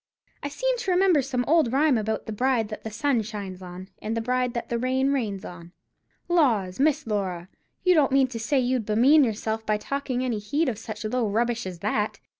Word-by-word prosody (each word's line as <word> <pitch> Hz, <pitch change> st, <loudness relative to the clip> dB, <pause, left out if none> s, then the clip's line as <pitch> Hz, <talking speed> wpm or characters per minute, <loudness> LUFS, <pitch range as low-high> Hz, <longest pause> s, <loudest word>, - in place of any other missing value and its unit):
"I 285 Hz, -, -3 dB
seem -, -, -1 dB
to 390 Hz, -, -3 dB
remember 360 Hz, -4 st, +4 dB
some 250 Hz, -2 st, -2 dB
old 310 Hz, -6 st, +3 dB
rhyme 285 Hz, +1 st, +3 dB
about 220 Hz, -1 st, -2 dB
the -, -, -5 dB
bride 235 Hz, -1 st, +1 dB
that 215 Hz, -, -7 dB
the 220 Hz, -, -4 dB
sun 235 Hz, +3 st, 0 dB
shines 200 Hz, -4 st, -7 dB
on, 180 Hz, +1 st, -9 dB
and 220 Hz, +2 st, -3 dB
the -, -, +1 dB
bride 250 Hz, +1 st, -1 dB
that 235 Hz, -, -3 dB
the 235 Hz, -, -1 dB
rain 260 Hz, +2 st, +1 dB
rains 210 Hz, -8 st, -2 dB
on." 175 Hz, 0 st, -10 dB, 0.5 s
"Laws, 235 Hz, -, +2 dB
Miss 300 Hz, +1 st, +2 dB
Laura, 190 Hz, -5 st, -3 dB, 0.3 s
you 365 Hz, -, +5 dB
don't 295 Hz, -6 st, +3 dB
mean 270 Hz, 0 st, +4 dB
to 235 Hz, -2 st, -6 dB
say 275 Hz, +6 st, 0 dB
as 260 Hz, -, +3 dB
you'd 250 Hz, -2 st, 0 dB
bemean 260 Hz, +8 st, +5 dB
yourself 220 Hz, -1 st, -2 dB
by 215 Hz, -1 st, 0 dB
taking 260 Hz, +1 st, -3 dB
any 235 Hz, -4 st, -1 dB
heed 285 Hz, +9 st, 0 dB
of 220 Hz, -4 st, -4 dB
such 220 Hz, -1 st, -7 dB
low 230 Hz, 0 st, 0 dB
rubbish 235 Hz, 0 st, 0 dB
as 175 Hz, -2 st, -8 dB
that?" 210 Hz, +1 st, -1 dB
235 Hz, 220 wpm, -25 LUFS, 210-275 Hz, 0.5 s, you